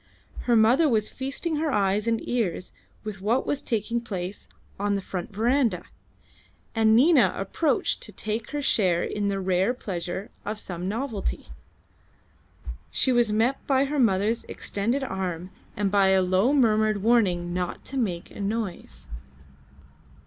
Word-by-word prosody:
Her 240 Hz, -, +3 dB
mother 245 Hz, +8 st, +5 dB
was 215 Hz, -4 st, +1 dB
feasting 275 Hz, +5 st, -3 dB
her 310 Hz, 0 st, 0 dB
eyes 205 Hz, 0 st, +1 dB
and 230 Hz, -1 st, 0 dB
ears 205 Hz, -7 st, -1 dB, 0.3 s
with 210 Hz, -3 st, -6 dB
what 230 Hz, +6 st, +1 dB
was 290 Hz, -, -1 dB
taking 230 Hz, +1 st, -1 dB
place 190 Hz, -4 st, -5 dB, 0.3 s
on 205 Hz, 0 st, +1 dB
the 200 Hz, -, -2 dB
front 180 Hz, 0 st, -5 dB
verandah, 225 Hz, -3 st, +1 dB, 0.9 s
and 220 Hz, -1 st, +4 dB
Nina 255 Hz, -, +5 dB
approached 295 Hz, -, 0 dB
to -, -, -5 dB
take 220 Hz, +2 st, -4 dB
her 295 Hz, -1 st, -3 dB
share 180 Hz, -9 st, +2 dB
in 205 Hz, -1 st, -2 dB
the 200 Hz, -1 st, -1 dB
rare 190 Hz, +5 st, +1 dB
pleasure 190 Hz, 0 st, -5 dB
of 210 Hz, +1 st, -4 dB
some 180 Hz, -2 st, -5 dB
novelty. 225 Hz, -, -3 dB, 1.4 s
She 260 Hz, -, +2 dB
was 240 Hz, -3 st, +3 dB
met 230 Hz, +5 st, +1 dB
by 270 Hz, 0 st, +3 dB
her 290 Hz, +1 st, -2 dB
mother's 220 Hz, 0 st, +2 dB
extended 235 Hz, +7 st, -2 dB
arm 185 Hz, -5 st, -4 dB, 0.3 s
and 200 Hz, -1 st, 0 dB
by 200 Hz, -1 st, +4 dB
a 190 Hz, -1 st, +4 dB
low 185 Hz, +7 st, +2 dB
murmured 215 Hz, -6 st, +3 dB
warning 185 Hz, -7 st, +2 dB
not 180 Hz, -1 st, -3 dB
to 275 Hz, -, -5 dB
make 185 Hz, -9 st, -2 dB
a -, -, -11 dB
noise. 205 Hz, -2 st, -4 dB
215 Hz, 150 wpm, -26 LUFS, 190-245 Hz, 1.4 s, mother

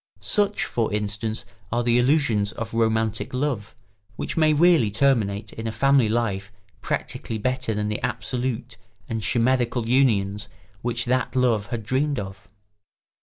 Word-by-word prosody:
Such, 205 Hz, -1 st, +2 dB
for 115 Hz, -2 st, -1 dB
instance, 105 Hz, +1 st, -2 dB, 0.3 s
are 120 Hz, +1 st, +1 dB
the 120 Hz, 0 st, +3 dB
illusions 120 Hz, -6 st, +2 dB
of 115 Hz, 0 st, -6 dB
romantic 110 Hz, 0 st, 0 dB
love, 125 Hz, -7 st, -2 dB, 0.4 s
which -, -, -4 dB
may 155 Hz, -1 st, +4 dB
really 155 Hz, -6 st, +4 dB
terminate 110 Hz, -3 st, +1 dB
in 115 Hz, 0 st, -5 dB
a -, -, -1 dB
family 135 Hz, +1 st, +3 dB
life 100 Hz, -4 st, -1 dB, 0.3 s
practically 115 Hz, -, -3 dB
better 130 Hz, 0 st, -1 dB
than 105 Hz, 0 st, -1 dB
the 105 Hz, 0 st, -3 dB
absolute 125 Hz, 0 st, -3 dB, 0.3 s
and 115 Hz, -1 st, -3 dB
chimerical 120 Hz, 0 st, +1 dB
unions 105 Hz, -6 st, +2 dB, 0.3 s
which 120 Hz, 0 st, -2 dB
that 125 Hz, 0 st, 0 dB
love 115 Hz, -5 st, +2 dB
had 115 Hz, 0 st, -4 dB
dreamed 140 Hz, +5 st, 0 dB
of. 95 Hz, 0 st, -7 dB
115 Hz, 140 wpm, -24 LUFS, 105-130 Hz, 0.4 s, may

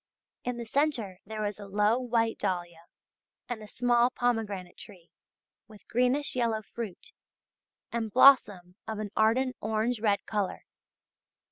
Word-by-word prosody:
In 245 Hz, -1 st, -3 dB
the 235 Hz, -, -5 dB
centre 230 Hz, -8 st, -1 dB
there 215 Hz, 0 st, -3 dB
is 205 Hz, 0 st, -4 dB
a 200 Hz, -, -8 dB
low 210 Hz, +4 st, +2 dB
white 230 Hz, -3 st, 0 dB
dahlia 175 Hz, -4 st, -3 dB, 0.6 s
and 240 Hz, -3 st, -5 dB
a 215 Hz, -, -10 dB
small 240 Hz, +1 st, +2 dB
pomegranate 220 Hz, -8 st, -2 dB
tree 180 Hz, -5 st, -14 dB, 0.6 s
with 215 Hz, -3 st, -16 dB
greenish 250 Hz, +5 st, +1 dB
yellow 230 Hz, -3 st, 0 dB
fruit, 230 Hz, -, -8 dB, 0.8 s
and 230 Hz, -2 st, -2 dB
blossom 205 Hz, -8 st, +5 dB
of 220 Hz, -, -4 dB
an 210 Hz, -1 st, -5 dB
ardent 250 Hz, +4 st, +2 dB
orange 220 Hz, +2 st, 0 dB
red 205 Hz, -2 st, +1 dB
colour. 205 Hz, -3 st, -2 dB
220 Hz, 135 wpm, -29 LUFS, 205-245 Hz, 0.8 s, blossom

